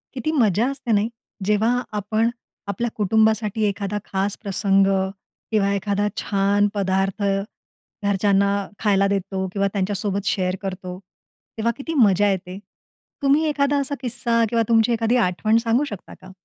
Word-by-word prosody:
किती 270 +4 -2
मजा 230 - +2
असते 265 -4 -4
नाही, 210 +1 +2 0.4
जेव्हा 220 +4 +2 0.2
आपण 215 +3 +1 0.4
आपल्या 220 +4 -2
कुटुंबासाठी 220 +1 +2
एखादा 200 0 -2
खास 195 +1 -2
प्रसंग 195 -1 +2 0.6
किंवा 200 -2 +2
एखादा 200 +1 0
छान 200 +1 +2
पदार्थ 195 0 0 0.8
घरच्यांना 200 0 +2 0.3
खायला 200 -2 +3
देतो 195 -1 -2
किंवा 200 -1 +1
त्यांच्यासोबत 200 0 -1
शेअर 185 -2 0
करतो, 185 -2 -5 0.6
तेव्हा 225 +1 +1
किती 325 +4 -5
मजा 205 0 +4
येते. 185 -1 -4 0.7
तुम्ही 280 +3 +4
एखादा 285 -1 +1
असा 280 +1 -2
किस्सा 235 -2 0
किंवा 230 0 +2
तुमची 225 0 +4
एखादी 230 +1 +1
आठवण 215 +1 +2
सांगू 235 +4 +2
शकता 205 - -8
का? 185 - -12
205 Hz, 135 wpm, -22 LUFS, 195-230 Hz, 0.8 s, मजा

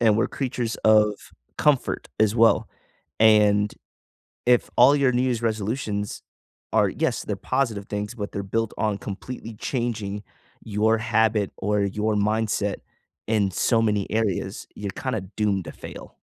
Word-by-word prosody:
and 110 -3 +4
we're 115 - +1
creatures 125 -4 -3
of 105 -1 +5 0.5
comfort 145 -4 +1
as 110 -1 +3
well. 115 0 +4 0.5
And 105 -1 +5 0.7
if 125 -1 +3
all 130 +4 +7
your 140 -3 +3
New 125 +1 +2
Year's 125 -3 0
resolutions 110 -1 -2 0.5
are - - +4
yes, - - -1
they're - - -3
positive 120 -7 -1
things, 105 +2 -4
but 105 -3 -5
they're 100 - -3
built 115 +2 -2
on 105 -2 0
completely 110 +3 -7
changing 110 -4 -3 0.4
your 110 +1 +2
habit 110 -2 +1
or 105 0 0
your 105 +2 0
mindset 105 -1 0 0.5
in 105 -3 +1
so 115 +5 +2
many 105 -3 +1
areas, 110 -4 -1
you're 100 -1 -4
kinda 130 -1 -3 0.2
doomed 100 -3 +1
to - - -6
fail. - - -10
110 Hz, 145 wpm, -24 LUFS, 105-115 Hz, 0.7 s, all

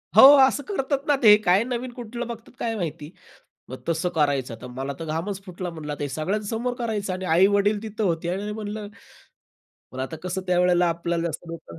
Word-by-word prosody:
हो, - - +10 0.3
असं 285 +2 -2
करतात 280 -6 -2
ना, 290 - +4
ते 210 -2 +9
काय 185 +4 +5
नवीन 250 0 -4
कुठलं 240 0 -6
बघतात 230 -1 -8
काय 230 -1 -1
माहिती. 160 -6 -4 0.6
मग 130 0 -8
तसं 165 +2 0
करायचं, 140 -6 +1
तर 125 - -7
मला 135 +3 -5
तर 165 - -5
घामच 175 +6 -3
फुटला, 180 -1 -5
म्हणल 155 -3 -6
ते 145 - -2
सगळ्यांसमोर 210 - -2
करायचं 210 -5 -2
आणि 185 +1 -5
आई-वडील 200 +3 +3
तिथं 220 0 -4
होते 170 -2 0
आणि 205 +2 -4
म्हणलं, 210 0 -5 1.0
पण 130 - -7
आता 135 +5 -4
कसं 185 +1 -3
त्यावेळेला 180 -1 +3
आपल्याला 170 0 -1
जास्त 170 - -5
लोकं 120 - -9
185 Hz, 185 wpm, -24 LUFS, 165-215 Hz, 1.0 s, हो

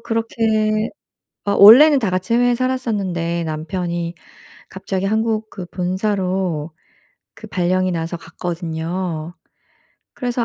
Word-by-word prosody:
그렇게 220 -1 0 0.6
어 200 - +1
원래는 265 +9 +8
다 215 - 0
같이 185 +4 -1
해외에 245 0 +3
살았었는데 200 -10 -1
남편이 170 +2 -3 0.6
갑자기 190 0 -4
한국 220 +1 0
그 185 -3 -8
본사로 185 -3 -2 0.7
그 - - -11
발령이 185 0 0
나서 165 0 -3
갔거든요. 170 0 -4 0.8
그래서 245 -2 -2
190 Hz, 245 characters per minute, -19 LUFS, 170-220 Hz, 0.8 s, 원래는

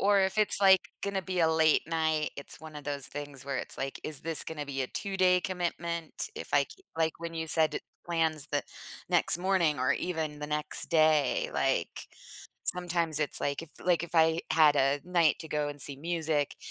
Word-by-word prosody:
Or 200 0 +4
if 190 +2 +1
it's 210 -1 +5
like 190 -1 +7 0.2
gonna 200 -1 -2
be 185 -1 -2
a 160 - +4
late 160 -1 +4
night, 160 -2 0
it's 140 - -7
one 155 -1 -10
of 145 - -9
those 140 -2 -2
things 145 -2 -7
where 140 -1 -3
it's - - -4
like, 135 0 -4
"Is 150 -3 -2
this 165 -1 +1
gonna 150 -2 -5
be 135 -1 -2
a - - -2
two-day 185 -2 +1
commitment?" 170 - -3
If - - -5
I - - +5
k 380 - -16
like 160 -1 +1
when 165 0 -6
you 160 0 -3
said 160 -1 +1 0.3
plans 160 -3 0
the 145 - +1 0.5
next 170 - +3
morning 175 -6 +2
or 130 +2 +3
even 160 -4 -3
the 150 - -4
next 150 0 -2
day, 155 -4 +3
like 135 -11 -1 0.6
sometimes 170 -3 0
it's 150 - 0
like 140 +2 -1
if 160 - -10
like 175 -3 +2
if 170 - -11
I 160 0 +4
had 155 -2 +5
a 140 +1 +2
night 170 -3 +2
to 160 - -7
go 150 -1 -1
and 145 -1 -7
see 140 -2 -1
music, 160 -2 -1
160 Hz, 200 wpm, -30 LUFS, 145-175 Hz, 0.6 s, like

